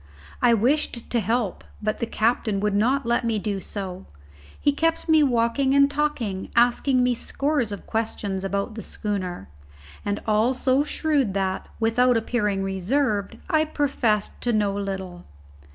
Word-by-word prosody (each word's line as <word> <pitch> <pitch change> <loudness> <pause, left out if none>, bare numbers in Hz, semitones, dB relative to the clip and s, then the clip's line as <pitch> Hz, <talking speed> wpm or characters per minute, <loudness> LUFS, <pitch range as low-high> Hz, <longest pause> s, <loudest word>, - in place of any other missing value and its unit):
I 240 -1 +5
wished 245 +1 0
to 240 - +2
help, 225 -1 -1 0.2
but 215 0 -2
the 235 - -1
captain 220 -2 0
would 210 0 0
not 250 +6 +2
let 235 +1 +1
me 230 -2 0
do 205 -1 -2
so; 190 -1 -6 0.5
he 290 - +3
kept 330 +4 0
me 315 -1 +5
walking 265 +1 +2
and 280 0 +5
talking, 270 -10 -2
asking 250 +2 +3
me 250 0 +3
scores 275 -1 -1
of 200 - -7
questions 205 -3 -2
about 200 +3 -2
the 220 - -6
schooner, 185 - -4 0.6
and 205 0 -1
all 220 +4 +2
so 260 +2 +2
shrewd 290 -9 0
that, 190 -1 -1
without 235 +2 +3
appearing 210 -4 0
reserved, 200 +3 -1
I 315 -4 +3
professed 270 -9 0
to 245 - +1
know 210 -3 +1
little. 190 -3 -5
225 Hz, 150 wpm, -24 LUFS, 200-265 Hz, 0.6 s, I